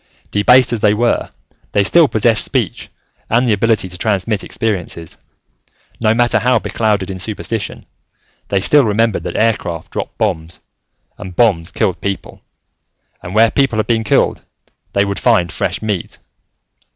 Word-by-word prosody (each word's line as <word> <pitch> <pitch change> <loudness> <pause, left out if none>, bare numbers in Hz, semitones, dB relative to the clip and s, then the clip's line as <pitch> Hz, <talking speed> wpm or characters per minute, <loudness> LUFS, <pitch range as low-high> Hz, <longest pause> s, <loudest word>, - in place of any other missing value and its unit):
Debased 125 +4 +4
as 115 - -1
they 105 -1 +3
were, 120 +2 0 0.4
they 100 - +3
still 165 - +5
possessed 110 -1 +3
speech - - -2 0.4
and 120 +3 +2
the 110 - +3
ability 110 -1 +1
to 90 -1 -9
transmit 105 0 -1
experiences. 90 -7 -4 0.8
No 110 -1 +2
matter 120 -1 +2
how 125 +1 +2
beclouded 105 -3 -1
in 95 - -6
superstition, 110 +2 -5 0.6
they 100 -1 0
still 145 +8 +5
remembered 110 0 +1
that - - -4
aircraft 105 -7 -1
dropped - - -5
bombs, 80 +1 -2 0.6
and 95 -1 -8
bombs 95 -7 +2
killed 95 - -1
people, 100 -2 -5 0.8
and 90 +3 -8
where 115 +1 +5
people 135 -5 +1
had 110 - +1
been 115 0 0
killed, - - +1 0.5
they 100 0 +2
would 100 0 -3
find 85 -2 +2
fresh - - -3
meat. 105 -5 -3
110 Hz, 150 wpm, -16 LUFS, 95-115 Hz, 0.8 s, still